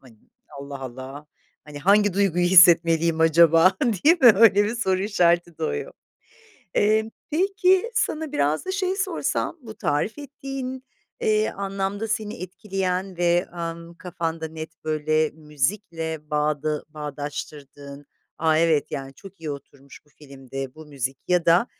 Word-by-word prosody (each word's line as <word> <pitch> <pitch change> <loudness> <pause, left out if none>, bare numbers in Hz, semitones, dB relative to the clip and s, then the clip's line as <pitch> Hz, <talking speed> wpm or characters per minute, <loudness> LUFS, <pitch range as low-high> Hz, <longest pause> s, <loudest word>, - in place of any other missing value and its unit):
hani, 115 -5 -19 0.4
"Allah 140 -1 -8
Allah! 130 +3 -8 0.4
Hani, 150 -1 -9
hangi 205 +4 +3
duyguyu 180 -3 +1
hissetmeliyim 170 -2 +5
acaba?" 165 +3 +5
değil 275 - +3
mi, 240 -4 +9
öyle 205 -1 +5
bir 220 +3 -2
soru 190 -5 0
işareti 175 -4 +1
doğuyor. 455 +1 -3 0.8
Emm, 220 +1 +2 0.2
peki, 380 +5 +2
sana 310 -1 -1
biraz 155 - 0
da 375 - -2
şeyi 380 -1 -1
sorsam: 385 - -2
Bu 220 -3 -10
tarif 150 - -1
ettiğin, 270 -2 -7 0.4
eee, 435 -2 +1
anlamda 195 +2 -3
seni 215 -1 -2
etkileyen 190 -1 -3
ve, 175 +1 +2
ımm, 170 0 -6
kafanda 165 -2 -4
net, 160 0 -10
böyle, 155 0 0
müzikle 160 +1 -3
bağda 150 0 -1
bağdaştırdığın, 145 -1 -8 0.3
"A! 160 -1 +2
Evet. 160 -3 +2
Yani, 135 -2 -6
çok 195 +2 -14
iyi 155 - -5
oturmuş 140 -1 -11
bu - - -27
filmde 135 -2 -9
bu 155 -1 -12
müzik." 135 -2 -4
ya 180 -2 +2
da 175 +8 +5
170 Hz, 135 wpm, -23 LUFS, 150-210 Hz, 0.8 s, mi